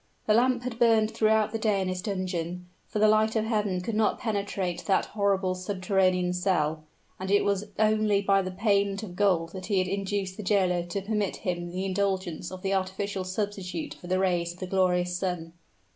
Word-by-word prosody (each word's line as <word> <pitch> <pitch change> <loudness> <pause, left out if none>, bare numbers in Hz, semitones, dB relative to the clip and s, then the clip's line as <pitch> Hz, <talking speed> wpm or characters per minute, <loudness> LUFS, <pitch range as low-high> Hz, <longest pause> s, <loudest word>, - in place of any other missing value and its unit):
The 215 - +3
lamp 245 +2 +3
had 245 -2 -5
burned 225 -2 +4
throughout 220 -1 +2
the 225 - -3
day 215 -3 +2
in 190 - -1
his 185 0 -2
dungeon; 180 -3 -3 0.2
for - - -4
the 215 +1 +5
light 215 +1 +3
of 220 -1 +1
heaven 210 -5 0
could 225 +5 -4
not 215 0 +2
penetrate 200 -5 -2
that 195 - +3
horrible 200 -3 +1
subterranean 185 -1 +1
cell 160 -4 0 0.3
and 190 0 -4
it 205 +1 +3
was 200 0 0
only 215 -1 +3
by 195 0 +3
the 185 - -4
payment 200 +1 +1
of 180 -4 -7
gold 180 -4 +2
that 185 0 -7
he 205 -3 +1
had 185 0 +2
induced 195 0 -2
the - - -4
jailer 185 -3 +2
to 195 +3 -3
permit 210 -1 -1
him 175 -1 -2
the 185 +2 -3
indulgence 190 -3 -1
of 185 0 -8
the 195 0 0
artificial 190 +1 -2
substitute 185 -3 -4
for 175 - -12
the 185 +1 +1
rays 175 -2 +1
of 175 - -18
the 185 - -3
glorious 180 -1 +1
sun. 180 -3 -3
195 Hz, 200 wpm, -27 LUFS, 180-210 Hz, 0.3 s, the